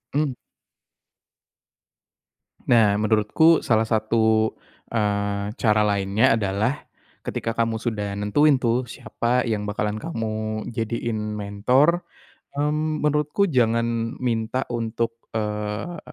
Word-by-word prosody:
Mmm. 145 Hz, -3 st, +1 dB, 2.4 s
Nah, 110 Hz, -4 st, +5 dB
menurutku 110 Hz, +10 st, +4 dB
salah 110 Hz, -1 st, +3 dB
satu, 110 Hz, 0 st, +2 dB, 0.4 s
eee, 100 Hz, -2 st, -1 dB
cara 110 Hz, -2 st, +3 dB
lainnya 100 Hz, +2 st, +2 dB
adalah 105 Hz, +7 st, -1 dB, 0.4 s
ketika 115 Hz, -, -3 dB
kamu 115 Hz, -1 st, 0 dB
sudah 105 Hz, -4 st, -3 dB
nentuin 135 Hz, +7 st, +3 dB
tuh 120 Hz, +2 st, +1 dB
siapa 120 Hz, +2 st, -1 dB
yang 110 Hz, -2 st, -1 dB
bakalan 105 Hz, 0 st, -2 dB
kamu 110 Hz, -6 st, -4 dB
jadiin 115 Hz, -1 st, -3 dB
mentor, 125 Hz, -, +2 dB, 0.5 s
mmm, 150 Hz, +2 st, -1 dB
menurutku 150 Hz, +6 st, +2 dB
jangan 115 Hz, -3 st, +1 dB
minta 120 Hz, +1 st, -1 dB
untuk, 115 Hz, 0 st, -2 dB, 0.2 s
eee, 105 Hz, +10 st, -3 dB
115 Hz, 95 wpm, -23 LUFS, 105-125 Hz, 2.4 s, Nah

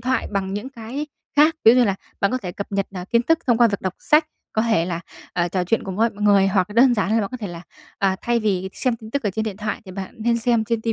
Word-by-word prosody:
thoại 255 Hz, 0 st, -1 dB
bằng 195 Hz, -1 st, -1 dB
những 210 Hz, +6 st, -4 dB
cái 260 Hz, +4 st, -6 dB, 0.3 s
khác. 305 Hz, +3 st, +6 dB
Ví 225 Hz, -, +9 dB
dụ -, -, +3 dB
như 250 Hz, -, +5 dB
là 200 Hz, -3 st, +1 dB, 0.3 s
bạn 200 Hz, -, +2 dB
có 255 Hz, -, 0 dB
thể 180 Hz, -7 st, -6 dB
cập 200 Hz, +3 st, -7 dB
nhật, 195 Hz, -1 st, 0 dB
ờ, 180 Hz, -1 st, -5 dB
kiến 235 Hz, 0 st, +3 dB
thức 325 Hz, +6 st, +3 dB
thông 240 Hz, -3 st, +3 dB
qua 235 Hz, -1 st, +6 dB
việc 200 Hz, -, -3 dB
đọc 190 Hz, -1 st, -3 dB
sách, 305 Hz, +1 st, +3 dB, 0.3 s
có 220 Hz, -, +1 dB
thể 220 Hz, -8 st, +2 dB
là, 170 Hz, -2 st, -3 dB, 0.3 s
ờ, 175 Hz, -1 st, 0 dB
trò 180 Hz, +1 st, -1 dB
chuyện 225 Hz, +5 st, 0 dB
cùng 190 Hz, -1 st, -5 dB
với 230 Hz, +2 st, +3 dB
mọi 205 Hz, 0 st, -9 dB
người 200 Hz, -2 st, +5 dB
hoặc 190 Hz, 0 st, +1 dB
là 205 Hz, -, -8 dB
đơn 245 Hz, +1 st, +6 dB
giản 205 Hz, -1 st, 0 dB
là 225 Hz, -, +3 dB
bạn 200 Hz, -, -2 dB
có -, -, -3 dB
thể 225 Hz, -4 st, -5 dB
là, 170 Hz, 0 st, -8 dB, 0.4 s
à, 190 Hz, -1 st, +2 dB
thay 240 Hz, 0 st, +1 dB
vì 190 Hz, -3 st, 0 dB
xem 255 Hz, -3 st, -1 dB
tin 220 Hz, -1 st, -12 dB
tức 280 Hz, +4 st, -1 dB
ở 210 Hz, -, 0 dB
trên 220 Hz, +3 st, -2 dB
điện 210 Hz, -3 st, -4 dB
thoại 215 Hz, 0 st, -3 dB
thì 190 Hz, -, -10 dB
bạn 190 Hz, 0 st, -7 dB
nên 235 Hz, +1 st, +1 dB
xem 230 Hz, -1 st, +1 dB
trên 230 Hz, 0 st, -1 dB
ti 225 Hz, -, 0 dB
220 Hz, 315 wpm, -22 LUFS, 195-235 Hz, 0.4 s, Ví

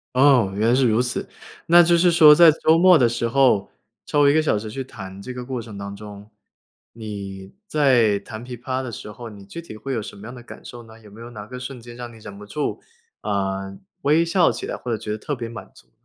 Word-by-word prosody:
哦， 130 Hz, -7 st, +4 dB
原 110 Hz, +2 st, +1 dB
来 120 Hz, -, +4 dB
是 130 Hz, -1 st, +3 dB
如 110 Hz, +3 st, +2 dB
此。 125 Hz, -, -3 dB, 0.4 s
那 175 Hz, +1 st, +7 dB
就 170 Hz, +1 st, +3 dB
是 175 Hz, +1 st, +4 dB
说 155 Hz, -3 st, +8 dB
在 165 Hz, 0 st, +8 dB
周 160 Hz, +1 st, +2 dB
末 180 Hz, 0 st, +6 dB
的 125 Hz, -5 st, +4 dB
时 120 Hz, 0 st, -2 dB
候， 130 Hz, -5 st, +2 dB, 0.3 s
抽 145 Hz, -2 st, +3 dB
1 140 Hz, -, +4 dB
个 155 Hz, -, +3 dB
小 110 Hz, -9 st, 0 dB
时 110 Hz, -, -7 dB
去 135 Hz, +5 st, -5 dB
弹 95 Hz, -5 st, -10 dB
这 125 Hz, +4 st, -7 dB
个 125 Hz, -1 st, -7 dB
过 125 Hz, -2 st, -4 dB
程 110 Hz, -3 st, -10 dB
当 100 Hz, 0 st, -7 dB
中， 105 Hz, 0 st, -11 dB, 0.6 s
你 100 Hz, -3 st, -8 dB
在 125 Hz, -9 st, +3 dB
弹 110 Hz, +3 st, -9 dB
琵 125 Hz, -1 st, -8 dB
琶 130 Hz, +1 st, -3 dB
的 125 Hz, -, -6 dB
时 105 Hz, -, -9 dB
候， 115 Hz, +2 st, -9 dB
你 100 Hz, -2 st, -13 dB
具 170 Hz, +12 st, -8 dB
体 110 Hz, -10 st, -11 dB
会 135 Hz, +5 st, -5 dB
有 115 Hz, -, -2 dB
什 105 Hz, -, -10 dB
么 105 Hz, +3 st, -11 dB
样 125 Hz, -, -9 dB
的 120 Hz, -, -12 dB
感 -, -, -13 dB
受 120 Hz, -1 st, -10 dB
呢？ 110 Hz, 0 st, -16 dB
有 105 Hz, -2 st, -16 dB
没 110 Hz, +3 st, -14 dB
有 120 Hz, -, -9 dB
哪 105 Hz, -3 st, -9 dB
个 125 Hz, +3 st, -9 dB
瞬 125 Hz, 0 st, -7 dB
间 120 Hz, 0 st, -12 dB
让 120 Hz, -1 st, -8 dB
你 115 Hz, -, -14 dB
忍 100 Hz, -2 st, -11 dB
不 105 Hz, -, -11 dB
住， 145 Hz, +8 st, -4 dB, 0.4 s
呃， 95 Hz, -1 st, -3 dB, 0.2 s
微 155 Hz, +4 st, +3 dB
笑 170 Hz, -4 st, +3 dB
起 115 Hz, -, -6 dB
来 -, -, -4 dB
或 125 Hz, -, -6 dB
者 115 Hz, -, 0 dB
觉 105 Hz, 0 st, -6 dB
得 105 Hz, -, -3 dB
特 145 Hz, -, -5 dB
别 120 Hz, -3 st, -5 dB
满 115 Hz, -1 st, -10 dB
足？ -, -, -20 dB
120 Hz, 275 characters per minute, -22 LUFS, 105-135 Hz, 0.6 s, 说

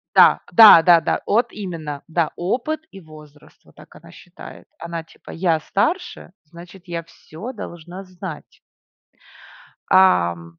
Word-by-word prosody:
Да, -, -, +6 dB
да-да-да. 170 Hz, -7 st, +6 dB
От 235 Hz, +3 st, +1 dB
именно. 160 Hz, -8 st, -7 dB
Да, 165 Hz, -1 st, -1 dB
опыт 265 Hz, -, -3 dB
и 195 Hz, -, -12 dB
возраст. 155 Hz, -2 st, -18 dB
Вот -, -, -23 dB
так -, -, -18 dB
она -, -, -16 dB
считает. -, -, -14 dB
Она, 170 Hz, -1 st, -6 dB
типа: 165 Hz, -, -20 dB
"Я 165 Hz, -2 st, 0 dB
старше, 315 Hz, -, -3 dB
значит, 170 Hz, +3 st, -15 dB
я 170 Hz, -1 st, -5 dB
всё 170 Hz, +7 st, -11 dB
должна 175 Hz, -3 st, -10 dB
знать". 185 Hz, -3 st, -11 dB, 1.3 s
Ам. 85 Hz, -, +2 dB
170 Hz, 125 wpm, -20 LUFS, 155-195 Hz, 1.3 s, Да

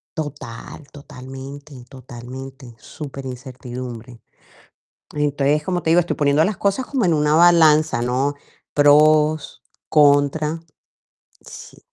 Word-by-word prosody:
Total, 145 Hz, -3 st, -8 dB
totalmente, 140 Hz, 0 st, -11 dB, 0.2 s
totalmente, 130 Hz, 0 st, -11 dB
superincertidumbre. 125 Hz, -4 st, -9 dB, 0.9 s
Entonces, 145 Hz, 0 st, 0 dB
como 180 Hz, -1 st, -3 dB
te 160 Hz, -, +1 dB
digo, 175 Hz, -, +5 dB
estoy 175 Hz, -, -3 dB
poniendo 145 Hz, +1 st, +2 dB
las 210 Hz, -2 st, -3 dB
cosas 200 Hz, +6 st, -1 dB
como 260 Hz, -8 st, -1 dB
en 170 Hz, -, +2 dB
una 150 Hz, 0 st, +2 dB
balanza, 160 Hz, -5 st, +4 dB
¿no? 130 Hz, +4 st, -1 dB, 0.4 s
Pros, 150 Hz, +1 st, +3 dB, 0.3 s
contra. 150 Hz, +1 st, +2 dB, 0.8 s
Sí. -, -, -13 dB
145 Hz, 100 wpm, -20 LUFS, 130-155 Hz, 0.9 s, digo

